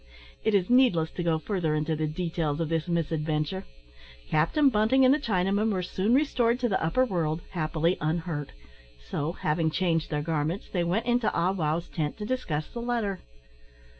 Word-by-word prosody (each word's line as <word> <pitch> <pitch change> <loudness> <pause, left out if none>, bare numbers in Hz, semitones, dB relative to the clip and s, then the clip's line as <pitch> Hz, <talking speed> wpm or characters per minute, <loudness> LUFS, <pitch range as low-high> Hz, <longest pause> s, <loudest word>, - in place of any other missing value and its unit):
It 220 - +2
is 185 -2 +2
needless 240 -11 +4
to - - -5
go 165 -2 +1
further 165 -3 -1
into 155 +1 0
the 155 0 -1
details 160 -2 -2
of 165 -2 -1
this 165 +1 -1
misadventure. 155 - -1 0.7
Captain 165 - +3
Bunting 230 +4 +3
and 255 - +6
the 300 - +1
Chinaman 200 0 +1
were 185 -2 -1
soon 195 +6 +1
restored 250 -4 +2
to 245 - +2
the 195 -7 0
upper 210 +11 +2
world, 165 -7 -1
happily, 165 0 0
unhurt; 160 -1 -2 0.5
so, 145 - -3
having 160 -1 0
changed 165 -1 0
their 150 -1 -1
garments, 160 +3 -2
they 175 -3 0
went 185 +7 0
into 240 -2 +2
Ah 175 +2 +2
wow's 165 -2 -1
tent 150 -3 -3
to 210 - -5
discuss 175 -12 -2
the 235 - -7
letter. 230 -5 -1
170 Hz, 175 wpm, -27 LUFS, 155-215 Hz, 0.7 s, and